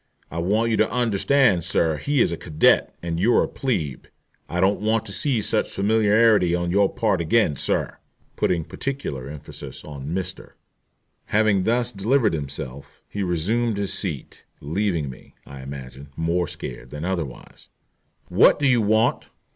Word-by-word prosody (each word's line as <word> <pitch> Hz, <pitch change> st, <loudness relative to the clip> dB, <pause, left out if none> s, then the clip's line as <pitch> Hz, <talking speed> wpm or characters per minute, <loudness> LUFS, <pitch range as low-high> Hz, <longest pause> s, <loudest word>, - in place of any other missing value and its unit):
I 85 Hz, -, -4 dB
want 105 Hz, +7 st, +1 dB
you 110 Hz, -, +2 dB
to -, -, +3 dB
understand, 120 Hz, -, +2 dB
sir, 80 Hz, -2 st, +1 dB
he 140 Hz, -, +1 dB
is -, -, +2 dB
a -, -, -1 dB
cadet 80 Hz, -2 st, +2 dB
and 85 Hz, -1 st, -2 dB
you're 115 Hz, +7 st, +4 dB
a -, -, -2 dB
'plebe,' 85 Hz, -, -3 dB, 0.4 s
and 85 Hz, -, -3 dB
I -, -, +1 dB
don't 95 Hz, +3 st, +3 dB
want 110 Hz, +1 st, +1 dB
to 100 Hz, -, -5 dB
see 125 Hz, +2 st, +1 dB
such -, -, +1 dB
familiarity 105 Hz, -2 st, +3 dB
on 85 Hz, 0 st, -1 dB
your 100 Hz, +1 st, +3 dB
part 105 Hz, -6 st, 0 dB
again, 85 Hz, -2 st, +2 dB
sir," -, -, -2 dB, 0.4 s
putting 85 Hz, -3 st, 0 dB
particular 80 Hz, -, -5 dB
emphasis 75 Hz, -1 st, -8 dB
on 70 Hz, -2 st, -8 dB
"Mr." 90 Hz, +3 st, -4 dB, 0.7 s
Having 105 Hz, -3 st, +2 dB
thus 120 Hz, +1 st, +1 dB
delivered 110 Hz, +2 st, +1 dB
himself 70 Hz, -2 st, -6 dB
he 100 Hz, -, -4 dB
resumed 100 Hz, +6 st, 0 dB
his 100 Hz, -1 st, -2 dB
seat, 80 Hz, -9 st, -5 dB, 0.2 s
leaving 85 Hz, 0 st, -1 dB
me, 65 Hz, -, -12 dB
I 70 Hz, -1 st, -10 dB
imagine, 70 Hz, +1 st, -9 dB
more 85 Hz, +1 st, 0 dB
scared -, -, -8 dB
than 75 Hz, +2 st, -6 dB
otherwise. 85 Hz, -9 st, -5 dB, 0.6 s
"What -, -, +5 dB
do 145 Hz, -, -1 dB
you 125 Hz, -3 st, +4 dB
want?" 110 Hz, +3 st, +1 dB
95 Hz, 160 wpm, -23 LUFS, 80-110 Hz, 0.7 s, What